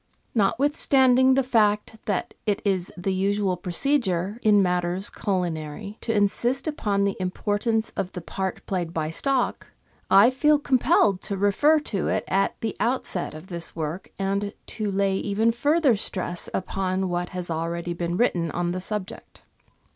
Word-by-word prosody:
Notwithstanding 260 +3 +3
the 270 - +3
fact 220 -3 +1
that 200 -3 -1
it 205 -1 +1
is 190 -3 0
the 190 +2 -1
usual 195 0 +1
procedure, 190 +1 0
in 205 -2 +5
matters 180 +1 0
culinary, 180 +1 -3
to 225 - -1
insist 240 +6 +1
upon 205 -10 0
the 200 0 0
importance 205 +4 -1
of 185 - -3
the 180 - -5
part 190 +2 -4
played 175 -3 -3
by 155 -1 -1
stock, 265 +7 -1 0.4
I 205 +6 +7
feel 295 +3 +3
compelled 235 -8 +2
to 200 - -3
refer 245 +11 +3
to 200 -10 -2
it - - 0
at 195 +1 0
the 225 -2 -2
outset 225 -8 -1
of 155 - -10
this 170 -3 -5
work, 160 +3 -4
and 200 +1 -2
to 215 -2 -3
lay 195 0 +1
even 210 +4 +1
further 285 +2 +3
stress 180 -3 -3
upon 190 0 -1
what 175 0 -2
has 180 -2 -5
already 170 +2 -2
been 175 0 -2
written 175 -8 +1
on 175 +2 -1
the 185 +1 -3
subject. 210 +2 -6
200 Hz, 155 wpm, -25 LUFS, 180-225 Hz, 0.4 s, I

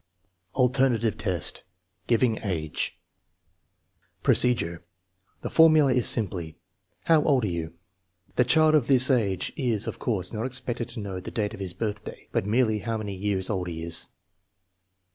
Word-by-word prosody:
Alternative 125 -3 +1
test: 95 -6 -3 0.5
giving 115 -1 +1
age 85 -8 -4 1.3
Procedure. 85 -9 +2 0.6
The - - -5
formula 155 -4 +5
is 125 -2 +7
simply, 90 -8 +2 0.2
" - - -45
How 160 -2 +4
old 135 -5 +2
are - - -1
you? 85 -1 -5 0.3
" 90 0 -39
The 125 - +4
child 155 +5 +3
of 145 -6 +2
this 130 0 +5
age 100 -8 -1
is, 115 -7 0
of - - -6
course, 95 -7 -2
not 110 +3 -3
expected 125 -2 -4
to 120 - -6
know 95 -2 -5
the 90 - -8
date 105 -1 -3
of 110 - -10
his 95 -3 -5
birthday, 105 +1 -6
but 95 - -1
merely 110 -1 +1
how 115 +2 -3
many 105 -2 -5
years 95 -1 -1
old 95 -3 -3
he 80 -1 -6
is. 85 0 0
110 Hz, 160 wpm, -25 LUFS, 95-125 Hz, 1.3 s, is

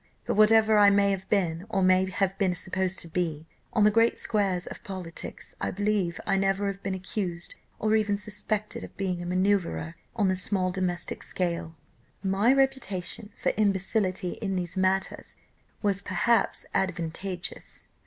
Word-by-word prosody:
But - - 0
whatever 215 0 +5
I 205 -1 +8
may 200 0 +4
have 195 0 -4
been, 180 -2 0
or 195 -3 +1
may 185 0 +4
have 195 0 0
been 185 -3 +2
supposed 185 +1 -1
to - - -6
be, 165 -2 -2 0.3
on 215 - +3
the 210 - +6
great 230 +2 +3
squares 195 -5 0
of - - -9
politics, 185 -4 -7
I - - 0
believe 200 -4 0
I - - +2
never 195 +1 +1
have 200 0 -3
been 195 -1 -2
accused 180 -2 -4 0.2
or 215 0 +2
even 210 -2 +2
suspected 210 +1 -3
of - - -11
being 185 -3 -2
a 175 - -5
manoeuvrer 180 - +1 0.2
on 210 -4 +2
the 185 - +2
small 185 0 0
domestic 180 -2 -2
scale. 170 -2 -2 0.5
"My 195 +5 +3
reputation 230 -6 0
for - - +1
imbecility 195 -2 +1
in 195 -3 -1
these 175 -2 -3
matters 190 0 0 0.5
was 200 -1 +2
perhaps 235 +3 +1
advantageous. 180 0 -3
190 Hz, 160 wpm, -27 LUFS, 180-205 Hz, 0.5 s, I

